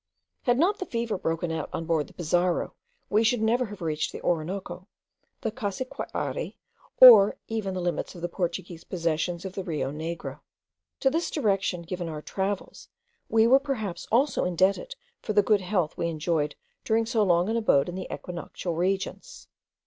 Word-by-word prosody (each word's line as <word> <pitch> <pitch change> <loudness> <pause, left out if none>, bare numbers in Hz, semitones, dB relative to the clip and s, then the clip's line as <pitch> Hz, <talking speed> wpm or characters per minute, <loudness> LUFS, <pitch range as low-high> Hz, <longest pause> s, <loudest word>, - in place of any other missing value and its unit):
Had 245 -2 +3
not 375 +8 +2
the 370 - -4
fever 230 -2 -2
broken 165 -1 -2
out 160 - -3
on 165 - -4
board 160 -3 0
the - - -17
Pizarro, 175 +1 0 0.4
we 215 +2 +4
should 225 0 +2
never 240 +3 +2
have 205 -4 -9
reached 155 -1 -1
the - - -8
Orinoco, 180 +3 -2 0.5
the 225 - -1
Cassiquiare, 255 - -4 0.4
or 220 -6 +10
even 215 -4 -3
the 185 - -2
limits 175 +2 -2
of 175 - -9
the - - +1
Portuguese 175 -1 -4
possessions 170 +1 -2
on 190 - -4
the 190 +1 -5
Rio 155 -6 -2
Negro. 165 +3 -5 0.6
To 270 - +3
this 330 +3 0
direction 195 - 0
given 175 0 -4
to 160 - -5
our 150 - -6
travels 195 0 -4 0.4
we 225 0 +4
were 260 +4 +6
perhaps 235 -10 -4
also 255 +4 +3
indebted 190 - +1 0.3
for 215 - -3
the 205 0 +5
good 210 -1 +3
health 180 -4 -1
we 170 - 0
enjoyed 155 -2 -1 0.3
during 225 +1 +2
so 225 -1 +1
long 175 -2 +3
an 225 - 0
abode 215 -12 +3
in 175 - -5
the 185 - -5
equinoctial 175 0 -5
regions. 190 +4 -3
190 Hz, 175 wpm, -27 LUFS, 170-220 Hz, 0.6 s, or